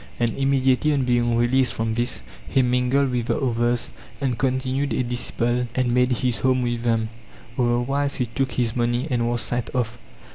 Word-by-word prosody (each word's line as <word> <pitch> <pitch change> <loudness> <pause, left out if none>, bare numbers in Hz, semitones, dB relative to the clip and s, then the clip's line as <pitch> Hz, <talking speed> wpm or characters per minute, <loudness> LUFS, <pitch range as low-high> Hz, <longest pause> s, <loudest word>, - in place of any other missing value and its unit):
And 120 -1 +2
immediately 135 +1 +2
on 140 -2 +1
being 120 -1 +2
released 125 +2 +2
from 115 0 -1
this 120 - -1 0.3
he 135 - +3
mingled 125 +2 +2
with 120 -2 -1
the - - 0
others 120 -2 0 0.3
and 130 -3 0
con 130 +2 0
tinued 135 +2 -1
a - - +2
disciple 120 0 -1
and 125 -2 +1
made 125 +1 +3
his 125 -2 0
home 130 +1 +2
with 120 -1 -1
them; 115 -2 0 0.5
other 120 -1 +2
wise 140 +3 -1
he 125 - 0
took 130 +2 -2
his 120 -2 0
money 120 +3 0
and 120 -1 +1
was 120 0 0
sent 120 -1 -1
off. 120 -2 -1
125 Hz, 190 wpm, -23 LUFS, 120-130 Hz, 0.5 s, he